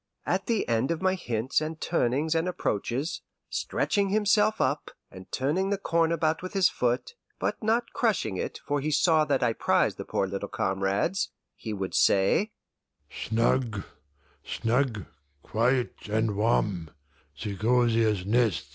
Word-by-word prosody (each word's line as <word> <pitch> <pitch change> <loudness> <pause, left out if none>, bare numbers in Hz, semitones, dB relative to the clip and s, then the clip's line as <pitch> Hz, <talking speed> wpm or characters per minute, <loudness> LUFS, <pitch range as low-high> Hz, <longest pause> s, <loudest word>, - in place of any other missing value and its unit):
At - - -1
the 230 -4 0
end 115 +2 +1
of 170 +2 -2
my 185 0 +3
hints 125 -7 -1
and 155 +1 -4
turnings 150 0 +1
and 165 +2 +1
approaches, 140 - -2 0.3
stretching 200 -1 0
himself 210 +1 +3
up, - - 0 0.2
and 95 0 -12
turning 165 +9 0
the 200 - +1
corn 165 -3 +1
about 160 -1 +1
with 185 - -6
his 190 -4 +4
foot 125 - -1 0.2
(but - - -2
not 230 +2 0
crushing 205 - 0
it, - - -3
for 145 -1 0
he 150 - -1
saw 155 +1 +4
that 135 -2 +1
I 115 -2 +2
prized - - +1
the - - -3
poor - - -1
little 100 +1 -4
comrades), 95 - 0 0.3
he 110 - -6
would 95 -2 -4
say: 100 - +3 0.6
"Snug, 115 -2 0 0.6
snug, 115 - 0 0.4
quiet 125 +3 +1 0.2
and 110 0 +1
warm! 100 -6 +1
135 Hz, 140 wpm, -27 LUFS, 110-175 Hz, 0.6 s, his